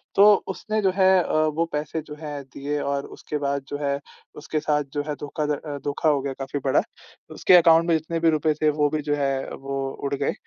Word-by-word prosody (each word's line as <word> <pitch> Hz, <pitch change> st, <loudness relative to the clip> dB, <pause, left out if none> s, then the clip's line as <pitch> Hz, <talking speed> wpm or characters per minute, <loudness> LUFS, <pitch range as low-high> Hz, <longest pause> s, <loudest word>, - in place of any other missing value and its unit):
तो 205 Hz, +1 st, +8 dB, 0.2 s
उसने 215 Hz, 0 st, -2 dB
जो 190 Hz, -, +3 dB
है 190 Hz, -1 st, +5 dB
अ, -, -, -4 dB
वो 155 Hz, +1 st, +2 dB
पैसे 150 Hz, +2 st, -2 dB
जो 150 Hz, -1 st, -10 dB
हैं 145 Hz, -2 st, -5 dB
दिए 140 Hz, +3 st, -4 dB
और 140 Hz, 0 st, -2 dB
उसके 150 Hz, -, -4 dB
बाद 140 Hz, -1 st, -1 dB
जो 145 Hz, -, -3 dB
है 140 Hz, 0 st, 0 dB, 0.4 s
उसके 155 Hz, -, -2 dB
साथ 150 Hz, -1 st, +1 dB
जो 145 Hz, 0 st, -1 dB
है 150 Hz, -, -2 dB
धोखाध 150 Hz, +1 st, -3 dB
अ, 145 Hz, 0 st, -4 dB
धोखा 145 Hz, +2 st, +1 dB
हो 140 Hz, -2 st, +2 dB
गया 135 Hz, -1 st, -3 dB
काफ़ी 135 Hz, +1 st, -3 dB
बड़ा। 130 Hz, -, +4 dB, 0.6 s
उसके 180 Hz, -, +6 dB
अकाउंट 165 Hz, 0 st, +5 dB
में 165 Hz, -, +4 dB
जितने 165 Hz, +1 st, -4 dB
भी 165 Hz, 0 st, +4 dB
रूपए 155 Hz, 0 st, +2 dB
थे, 155 Hz, -, +4 dB
वो 150 Hz, -1 st, +1 dB
भी 155 Hz, 0 st, -2 dB
जो 145 Hz, 0 st, -1 dB
है 140 Hz, -1 st, 0 dB, 0.2 s
वो 135 Hz, 0 st, -4 dB, 0.2 s
उड़ 140 Hz, -, -1 dB
गए, 140 Hz, 0 st, -1 dB
150 Hz, 230 wpm, -24 LUFS, 140-160 Hz, 0.6 s, तो